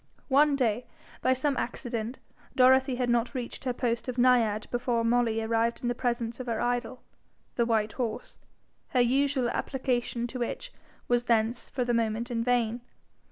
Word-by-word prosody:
One 285 +2 +5
day, 245 -3 0 0.3
by 260 - +3
some 275 +2 0
accident, 235 -1 -3 0.4
Dorothy 260 0 +5
had 250 0 -1
not 240 +2 +1
reached 245 +1 -5
her 255 - +1
post 240 -1 -2
of 250 0 -4
naiad 235 -4 +3
before 245 -1 0
Molly 230 -1 +2
arrived 230 +2 0
in 240 0 +1
presence 235 -1 -2
of 255 - -6
her 230 -2 -1
idol, 245 +1 -2 0.5
the 235 -1 +1
white 220 -2 +1
horse, 235 -4 -4 0.6
her - - +6
usual 265 +1 +2
application 245 -3 -1
to 250 +1 -6
which 375 - -4 0.3
was 240 0 +1
thence 230 +1 +1
for 250 -2 -2
the 240 - 0
moment 230 +1 0
in 230 -1 0
vain. 240 -1 +1
240 Hz, 160 wpm, -28 LUFS, 230-255 Hz, 0.6 s, her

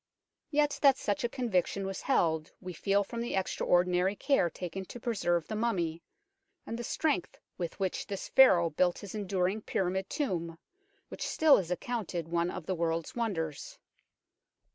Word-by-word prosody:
Yet 295 -1 +1
that 275 -2 +6
such 205 +2 -1
a 240 - +1
conviction 200 -6 0
was 195 -1 -4
held 160 - +1
we 180 -1 -7
feel 200 +4 +1
from 230 +4 -5
the 235 - -2
extraordinary 180 0 +2
care 270 -8 +2
taken 180 +2 -6
to 245 - -9
preserve 175 -8 0
the 215 - -4
mummy, 175 -8 -1 0.6
and 230 - -5
the - - -3
strength 230 - -1 0.2
with 170 +1 -4
which 190 -2 -2
this 195 -1 -5
Pharaoh 175 -11 +6
built 175 +3 +2
his 200 - -8
enduring 200 0 -1
pyramid 190 -1 -1
tomb, 170 - -2 0.5
which - - -9
still 315 -3 +5
is 175 -3 -2
accounted 180 -3 -3
one 170 +1 0
of 180 -2 -6
the 190 - -1
world's 165 -1 -1
wonders. 165 - -3
190 Hz, 160 wpm, -31 LUFS, 175-225 Hz, 0.6 s, that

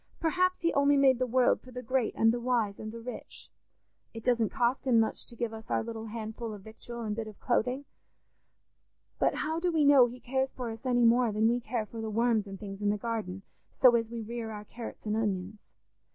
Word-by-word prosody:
Perhaps 365 +3 +1
he 335 -1 +1
only 280 0 +4
made 265 -3 +5
the 255 - +1
world 250 +1 +3
for 255 - -15
the 250 0 -7
great 255 0 0
and 225 0 +4
the 240 - -2
wise 235 -5 0
and 215 0 -6
the 230 - -8
rich. 245 +2 -8 0.6
It 225 - -7
doesn't 235 -3 +2
cost 250 +2 0
him 235 -3 +5
much 220 - -1
to 235 - -8
give 235 -1 -3
us 220 0 -10
our - - +1
little 225 -1 -6
handful 220 0 -5
of 200 - -12
victual 235 +2 -9
and 210 -1 -2
bit 225 -1 -4
of 215 - -11
clothing; 250 +3 0 1.3
but - - +2
how 320 +2 -1
do 355 +1 +1
we 315 -3 +3
know 280 -4 +7
he 245 +1 -9
cares 265 +2 -1
for 245 -3 -5
us 225 +4 -7
any 245 -1 +3
more 235 0 +4
than 215 +2 +2
we 240 +1 +2
care 230 -1 -3
for 225 +1 -8
the 220 - -3
worms 225 -1 +1
and 195 -1 -8
things 195 -1 -7
in 205 - +1
the 210 - +1
garden, 205 -4 -4 0.3
so 250 -2 +5
as 230 -1 0
we 230 -1 -5
rear 230 0 -5
our 210 -1 -7
carrots 230 +1 -9
and 210 0 0
onions? 205 -2 -2
230 Hz, 230 wpm, -30 LUFS, 220-250 Hz, 1.3 s, know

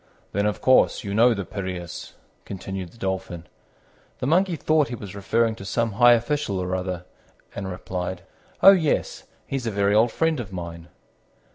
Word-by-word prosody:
"Then, 100 +1 +1
of 105 - -2
course, 130 0 +4
you 100 -2 -4
know 115 +3 +5
the 100 -2 -4
Piræus," 90 -3 -6 0.3
continued 95 -1 -6
the - - -19
Dolphin. 95 -4 -4 0.7
The - - -4
Monkey 175 +5 +2
thought 155 -1 +2
he 120 - -5
was 100 -5 -9
referring 110 +3 +1
to - - -9
some 115 +4 -1
high 120 +4 +6
official 120 -2 0
or 90 0 -2
other, 90 -1 -4 0.5
and 100 -1 -5
replied, 90 0 -5 0.4
"Oh, 195 - +11
yes, 165 -6 0 0.2
he's 135 -4 -3
a - - +2
very 100 0 +1
old 110 +2 +4
friend 160 -3 0
of 105 -5 -6
mine." 85 -2 -7
100 Hz, 170 wpm, -24 LUFS, 95-120 Hz, 0.7 s, Oh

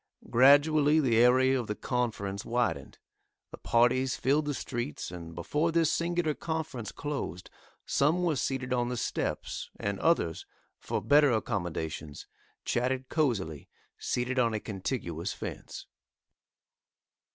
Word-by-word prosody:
Gradually 145 +4 +5
the 125 -7 +2
area 130 +2 +5
of 120 - -4
the 105 - -2
conference 105 -6 -2
widened. 120 0 -1 0.5
The - - -10
parties 125 +2 +2
filled 145 +4 +2
the 145 -1 -2
streets 120 -5 -4
and 85 -2 -8
before 150 - 0
this 165 -1 +2
singular 170 -2 0
conference 145 - -4
closed, 135 - -5 0.3
some 160 +6 +2
were 165 -3 +1
seated 130 -1 -2
on 120 -1 0
the 125 - -3
steps, - - -3
and 100 -1 -2
others, 125 - +1 0.3
for - - -3
better 145 0 +5
accommodations, 85 -9 -3 0.4
chatted 130 +1 -1
cosily, 100 - -1 0.3
seated 125 +1 -1
on 115 -3 +2
a - - -1
contiguous 95 - -4
fence. - - -7
125 Hz, 125 wpm, -29 LUFS, 105-145 Hz, 0.5 s, Gradually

